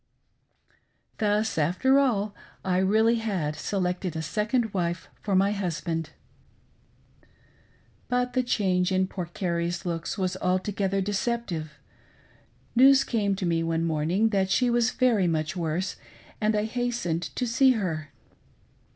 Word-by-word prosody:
Thus, 210 Hz, -3 st, +1 dB
after 185 Hz, -, +3 dB
all, 215 Hz, -7 st, +1 dB, 0.3 s
I 185 Hz, -1 st, +2 dB
really 220 Hz, +5 st, +3 dB
had 190 Hz, -10 st, -2 dB
selected 180 Hz, -2 st, -2 dB
a 160 Hz, -, -3 dB
second 220 Hz, -, -1 dB
wife 175 Hz, -2 st, -2 dB
for 200 Hz, -2 st, -1 dB
my 195 Hz, +2 st, +4 dB
husband! 170 Hz, -5 st, -2 dB, 2.0 s
But 250 Hz, 0 st, 0 dB
the 255 Hz, -, +2 dB
change 190 Hz, -6 st, +1 dB
in 190 Hz, 0 st, +2 dB
poor 185 Hz, -2 st, -5 dB
Carrie's 170 Hz, 0 st, -2 dB
looks 170 Hz, +3 st, -3 dB
was 185 Hz, -1 st, -1 dB
altogether 195 Hz, +1 st, 0 dB
deceptive. 195 Hz, -6 st, -2 dB, 1.0 s
News 270 Hz, +2 st, +7 dB
came 205 Hz, -4 st, 0 dB
to 190 Hz, -, -3 dB
me 165 Hz, -1 st, +1 dB
one 165 Hz, 0 st, 0 dB
morning 165 Hz, +7 st, +1 dB
that 195 Hz, -3 st, +1 dB
she 245 Hz, +5 st, +2 dB
was 235 Hz, -1 st, +3 dB
very 230 Hz, -8 st, +2 dB
much 155 Hz, 0 st, -1 dB
worse, 175 Hz, +2 st, -2 dB, 0.4 s
and 215 Hz, 0 st, +2 dB
I 210 Hz, -, +1 dB
hastened 235 Hz, -8 st, -2 dB
to 250 Hz, -, -1 dB
see 260 Hz, +3 st, +4 dB
her. 160 Hz, -9 st, -3 dB
195 Hz, 130 wpm, -26 LUFS, 170-225 Hz, 2.0 s, News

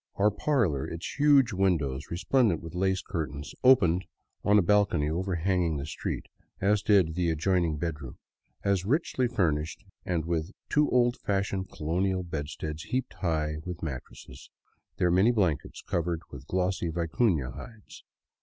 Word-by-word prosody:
Our 105 Hz, +2 st, +3 dB
parlor, 105 Hz, -, 0 dB
its 85 Hz, -, -6 dB
huge 140 Hz, -5 st, +5 dB
windows 75 Hz, -8 st, 0 dB
resplendent 100 Hz, -, +2 dB
with 80 Hz, 0 st, -9 dB
lace 95 Hz, +1 st, 0 dB
curtains, 75 Hz, -5 st, -5 dB
opened 95 Hz, -9 st, +5 dB, 0.4 s
on 105 Hz, 0 st, +5 dB
a 100 Hz, -, +5 dB
balcony 90 Hz, -6 st, +2 dB
overhanging 90 Hz, -1 st, 0 dB
the 70 Hz, -, -4 dB
street, 80 Hz, -, -4 dB, 0.3 s
as 100 Hz, +1 st, +2 dB
did 100 Hz, -6 st, +4 dB
also -, -, -6 dB
the 85 Hz, 0 st, 0 dB
adjoining 80 Hz, 0 st, +1 dB
bedroom, 75 Hz, -5 st, -5 dB, 0.5 s
as 100 Hz, -2 st, +1 dB
richly 130 Hz, -, +1 dB
furnished 85 Hz, -5 st, -1 dB, 0.2 s
and 85 Hz, -3 st, -1 dB
with 85 Hz, +3 st, -2 dB, 0.2 s
two 150 Hz, 0 st, +3 dB
old 120 Hz, 0 st, +3 dB
fashioned 95 Hz, -1 st, -2 dB
colonial 90 Hz, +4 st, -1 dB
bedsteads 80 Hz, -1 st, -5 dB
heaped 130 Hz, 0 st, -2 dB
high 75 Hz, -4 st, -1 dB
with 90 Hz, -2 st, -6 dB
mattresses, 65 Hz, -2 st, -8 dB, 0.5 s
their 90 Hz, -, +2 dB
many 95 Hz, +6 st, +5 dB
blankets 90 Hz, -, -1 dB
covered 85 Hz, -1 st, -1 dB
with 70 Hz, 0 st, -10 dB
glossy 90 Hz, -1 st, 0 dB
vicufia 80 Hz, -, 0 dB
hides. 110 Hz, -4 st, -12 dB
90 Hz, 145 wpm, -28 LUFS, 80-100 Hz, 0.5 s, huge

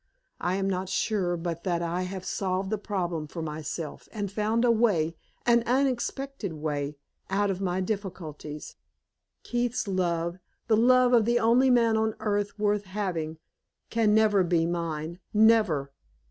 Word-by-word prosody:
I 180 Hz, +1 st, 0 dB
am 195 Hz, 0 st, 0 dB
not 185 Hz, -1 st, -2 dB
sure 190 Hz, -3 st, 0 dB
but 170 Hz, 0 st, -4 dB
that 175 Hz, -2 st, 0 dB
I 170 Hz, +2 st, -1 dB
have 190 Hz, -1 st, -6 dB
solved 190 Hz, +1 st, -1 dB
the 215 Hz, -, 0 dB
problem 175 Hz, -7 st, -2 dB
for 165 Hz, +2 st, -6 dB
myself, 155 Hz, 0 st, -5 dB
and 205 Hz, -3 st, -4 dB
found 220 Hz, +3 st, +1 dB
a 240 Hz, -, +5 dB
way 195 Hz, -9 st, +2 dB, 0.3 s
an 235 Hz, 0 st, +5 dB
unexpected 265 Hz, -, -1 dB
way 150 Hz, -1 st, -3 dB, 0.3 s
out 200 Hz, +1 st, +1 dB
of 190 Hz, 0 st, -4 dB
my 185 Hz, -1 st, 0 dB
difficulties. 180 Hz, -7 st, -5 dB, 0.7 s
Keith's 240 Hz, -2 st, -1 dB
love 175 Hz, -2 st, -1 dB, 0.3 s
the 225 Hz, -, +3 dB
love 250 Hz, +2 st, +5 dB
of 230 Hz, -3 st, +5 dB
the 240 Hz, +1 st, +3 dB
only 240 Hz, +3 st, +4 dB
man 230 Hz, -3 st, +4 dB
on 220 Hz, 0 st, 0 dB
earth 205 Hz, -1 st, -1 dB
worth 210 Hz, -1 st, +1 dB
having 180 Hz, -5 st, -3 dB, 0.5 s
can 220 Hz, -2 st, +3 dB
never 210 Hz, -3 st, +4 dB
be 170 Hz, -2 st, +2 dB
mine 165 Hz, -1 st, -3 dB, 0.2 s
never! 210 Hz, -11 st, +4 dB
195 Hz, 150 wpm, -27 LUFS, 170-220 Hz, 0.7 s, a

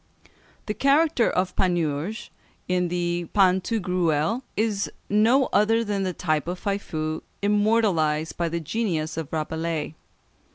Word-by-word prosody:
The 210 Hz, -, -2 dB
character 280 Hz, 0 st, +3 dB
of 185 Hz, 0 st, -1 dB
Panurge, 175 Hz, +2 st, -1 dB, 0.4 s
in 180 Hz, -1 st, +1 dB
the 175 Hz, 0 st, -2 dB
"Pantagruel," 185 Hz, -, +2 dB, 0.2 s
is 210 Hz, -2 st, 0 dB, 0.2 s
no 230 Hz, +6 st, +4 dB
other 225 Hz, +2 st, +3 dB
than 205 Hz, -2 st, -2 dB
the 185 Hz, -1 st, -1 dB
type 155 Hz, -3 st, -1 dB
of 180 Hz, +1 st, -3 dB
Faifeu, 160 Hz, -6 st, -3 dB, 0.2 s
immortalised 200 Hz, -7 st, +2 dB
by 170 Hz, -1 st, -1 dB
the 170 Hz, +1 st, -2 dB
genius 160 Hz, -3 st, -2 dB
of 160 Hz, -2 st, -5 dB
Rabelais. 160 Hz, 0 st, -2 dB
180 Hz, 120 wpm, -25 LUFS, 160-210 Hz, 0.4 s, no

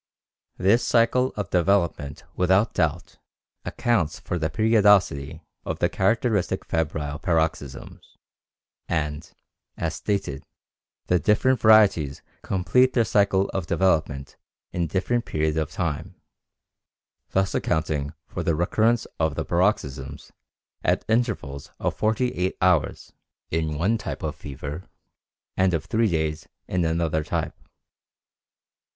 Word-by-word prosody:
This 105 Hz, +6 st, +3 dB
cycle 125 Hz, +2 st, +3 dB
of 105 Hz, -4 st, -4 dB
development 85 Hz, -5 st, +1 dB
without 95 Hz, +4 st, +2 dB
doubt 80 Hz, -5 st, -1 dB, 0.4 s
accounts 110 Hz, -11 st, 0 dB
for 90 Hz, -, -3 dB
the 80 Hz, 0 st, 0 dB
periodicity 105 Hz, -8 st, +3 dB, 0.2 s
of -, -, -3 dB
the -, -, +1 dB
characteristic 105 Hz, 0 st, 0 dB
febrile 75 Hz, -2 st, -2 dB
paroxysms; 80 Hz, -6 st, -2 dB, 0.7 s
and, 75 Hz, -1 st, -2 dB, 0.5 s
as 85 Hz, -1 st, -2 dB
stated, 95 Hz, -8 st, -3 dB, 0.6 s
the 90 Hz, -, +2 dB
different 125 Hz, +7 st, +2 dB
varieties 105 Hz, -10 st, +4 dB, 0.2 s
complete 125 Hz, +7 st, +2 dB
their 120 Hz, -3 st, +3 dB
cycle 100 Hz, -1 st, +2 dB
of 95 Hz, -4 st, -3 dB
development 75 Hz, -8 st, 0 dB, 0.3 s
in 85 Hz, -1 st, -1 dB
different 115 Hz, +8 st, -1 dB
period 80 Hz, 0 st, -1 dB
of 80 Hz, -2 st, -1 dB
time, 85 Hz, +2 st, -3 dB, 1.1 s
thus 95 Hz, 0 st, 0 dB
accounting 75 Hz, -2 st, -1 dB
for -, -, -5 dB
the 85 Hz, -, +1 dB
recurrence 110 Hz, +7 st, +2 dB
of 80 Hz, -2 st, +1 dB
the 80 Hz, -, -3 dB
paroxysms 75 Hz, -5 st, -1 dB, 0.5 s
at -, -, +1 dB
intervals 110 Hz, -, -1 dB
of -, -, -2 dB
forty 110 Hz, +3 st, +1 dB
eight 90 Hz, +1 st, -2 dB
hours, 90 Hz, -4 st, +1 dB, 0.4 s
in 80 Hz, -2 st, -1 dB
one 105 Hz, +8 st, +1 dB
type -, -, -6 dB
of 80 Hz, -1 st, -2 dB
fever, 75 Hz, +3 st, -7 dB, 0.7 s
and 95 Hz, -2 st, +2 dB
of 80 Hz, -, -3 dB
three 110 Hz, -1 st, +1 dB
days 80 Hz, -2 st, -2 dB, 0.2 s
in 90 Hz, -1 st, 0 dB
another 80 Hz, -1 st, 0 dB
type. 75 Hz, -, -2 dB
90 Hz, 120 wpm, -24 LUFS, 80-105 Hz, 1.1 s, varieties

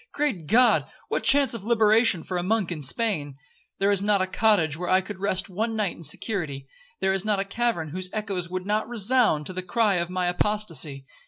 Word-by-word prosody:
Great 250 Hz, -, -2 dB
God! 245 Hz, +6 st, +4 dB, 0.2 s
what -, -, -1 dB
chance 280 Hz, -1 st, +4 dB
of 230 Hz, -4 st, -6 dB
liberation 220 Hz, -4 st, +3 dB
for 185 Hz, -, -4 dB
a -, -, -1 dB
monk 195 Hz, 0 st, 0 dB
in 160 Hz, -3 st, -5 dB
Spain? 145 Hz, -, 0 dB, 0.4 s
There 200 Hz, +1 st, +2 dB
is 200 Hz, -1 st, +1 dB
not 205 Hz, 0 st, +2 dB
a 185 Hz, -, +1 dB
cottage 185 Hz, -5 st, +2 dB
where 180 Hz, +2 st, -5 dB
I 185 Hz, -, +5 dB
could 190 Hz, 0 st, -8 dB
rest 190 Hz, -1 st, 0 dB
one 220 Hz, +4 st, -3 dB
night 210 Hz, -5 st, -1 dB
in -, -, -14 dB
security—there 175 Hz, -, -2 dB
is 195 Hz, -1 st, -2 dB
not 210 Hz, -2 st, 0 dB
a 195 Hz, -, -1 dB
cavern 200 Hz, -6 st, -1 dB
whose 185 Hz, +4 st, -5 dB
echoes 195 Hz, -5 st, -4 dB
would 185 Hz, 0 st, -4 dB
not 210 Hz, +2 st, -1 dB
resound 230 Hz, -8 st, +2 dB
to 185 Hz, -, -5 dB
the 185 Hz, -, -3 dB
cry 195 Hz, +2 st, +1 dB
of 170 Hz, 0 st, -2 dB
my 180 Hz, 0 st, -1 dB
apostacy. 175 Hz, -7 st, -2 dB
195 Hz, 205 wpm, -25 LUFS, 175-220 Hz, 0.4 s, I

